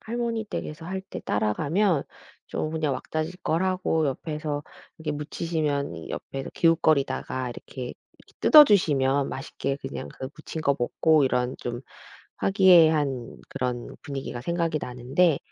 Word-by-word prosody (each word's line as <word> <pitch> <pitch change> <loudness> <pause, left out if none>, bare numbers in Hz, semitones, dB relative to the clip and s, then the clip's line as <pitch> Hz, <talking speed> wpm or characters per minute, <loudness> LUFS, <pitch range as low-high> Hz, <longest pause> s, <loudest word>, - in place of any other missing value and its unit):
할머니 230 -1 -2
댁에서 160 -6 -6
할 190 +3 -3
때 190 - -8
따라가면 145 - +1 0.4
좀 155 - -3
그냥 155 -3 0
왁자지껄 160 +4 -2
하고 185 -4 +1
옆에서 150 +1 -3 0.4
이렇게 155 -1 -3
묻히시면 150 -1 -2
옆에서 135 0 -5
기웃거리다가 140 -6 +2
이렇게 125 +1 -7 0.2
이렇게 - - -23
뜯어 305 -1 +10
주시면 140 - +2
맛있게 135 0 -3
그냥 135 - -6
그 130 - -7
묻힌 160 0 -6
거 140 -3 +2
먹고 150 +5 +3
이런 125 -1 0
좀 120 0 -5 0.6
화기애애한 160 - +4
그런 125 -1 -4
분위기가 135 -3 -5
생각이 170 -1 0
나는데 135 +6 +1
150 Hz, 315 characters per minute, -26 LUFS, 135-170 Hz, 0.6 s, 뜯어